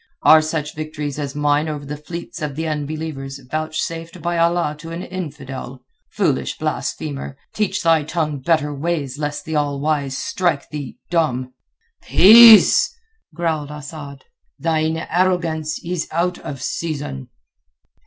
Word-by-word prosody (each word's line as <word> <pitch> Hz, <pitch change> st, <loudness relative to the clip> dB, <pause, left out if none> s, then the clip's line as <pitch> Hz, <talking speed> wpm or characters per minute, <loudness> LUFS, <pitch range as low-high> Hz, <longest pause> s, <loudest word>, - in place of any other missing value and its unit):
Are 160 Hz, 0 st, +8 dB
such 155 Hz, -1 st, -3 dB
victories 150 Hz, -2 st, -5 dB
as 140 Hz, -1 st, -4 dB
mine 150 Hz, +1 st, +1 dB
over 145 Hz, -2 st, -5 dB
the 145 Hz, +1 st, -5 dB
fleets 170 Hz, +4 st, -8 dB
of 150 Hz, -2 st, -3 dB
the 160 Hz, +2 st, -2 dB
unbelievers 150 Hz, -2 st, -4 dB
vouchsafed 155 Hz, +5 st, -4 dB
by 175 Hz, +2 st, -2 dB
Allah 170 Hz, -2 st, +1 dB
to 165 Hz, +1 st, -9 dB
an 170 Hz, +2 st, -5 dB
infidel? 140 Hz, -8 st, -7 dB, 0.3 s
Foolish -, -, 0 dB
blasphemer, 140 Hz, -2 st, -4 dB, 0.2 s
teach 210 Hz, -3 st, -1 dB
thy 165 Hz, -2 st, +4 dB
tongue 155 Hz, -1 st, -2 dB
better 150 Hz, 0 st, +1 dB
ways 145 Hz, -2 st, -2 dB
lest 150 Hz, -1 st, -3 dB
the 160 Hz, -, -3 dB
All 145 Hz, -2 st, 0 dB
wise 145 Hz, -2 st, -1 dB
strike 170 Hz, -6 st, -1 dB
thee 145 Hz, -4 st, -6 dB
dumb." 130 Hz, -7 st, 0 dB, 0.5 s
"Peace!" 220 Hz, +3 st, +8 dB, 0.4 s
growled 160 Hz, -3 st, -1 dB
Asad. 145 Hz, -2 st, -9 dB, 0.3 s
"Thine 160 Hz, 0 st, 0 dB
arrogance 165 Hz, -3 st, 0 dB
is 175 Hz, -1 st, -2 dB
out 175 Hz, +2 st, 0 dB
of 140 Hz, -2 st, -7 dB
season." 145 Hz, -, -4 dB
155 Hz, 135 wpm, -20 LUFS, 145-165 Hz, 0.5 s, Are